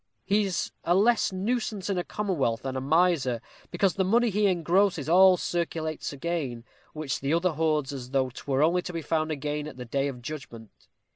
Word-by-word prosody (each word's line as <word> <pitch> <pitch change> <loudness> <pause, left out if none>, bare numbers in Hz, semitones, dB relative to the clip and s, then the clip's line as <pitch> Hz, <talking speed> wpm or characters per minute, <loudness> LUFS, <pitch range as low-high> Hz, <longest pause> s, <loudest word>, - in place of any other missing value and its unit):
He 205 +1 +2
is 190 -2 -2
a 175 - +2
less 220 +3 +3
nuisance 210 0 -2
in 195 -3 0
a - - -1
commonwealth 160 - -1
than 135 -1 -3
a 130 - -2
miser, 145 -4 +2 0.3
because 195 -3 +1
the 190 - 0
money 230 +4 +3
he 205 +1 +2
engrosses 175 -2 +2
all 185 +2 +6
circulates 165 -3 -3
again, 140 -5 -3 0.3
which 155 -4 -3
the 140 +4 0
other 175 +1 +1
hoards 155 -2 0
as 125 -3 -7
though 130 -1 0
'twere 135 +2 -1
only 175 +3 +3
to 180 - -7
be 165 -1 -4
found 155 +1 0
again 150 0 -3
at 150 - -10
the 125 - -7
day 135 +4 -1
of 125 -3 -7
judgment. 120 -6 -8
160 Hz, 195 wpm, -27 LUFS, 135-185 Hz, 0.3 s, all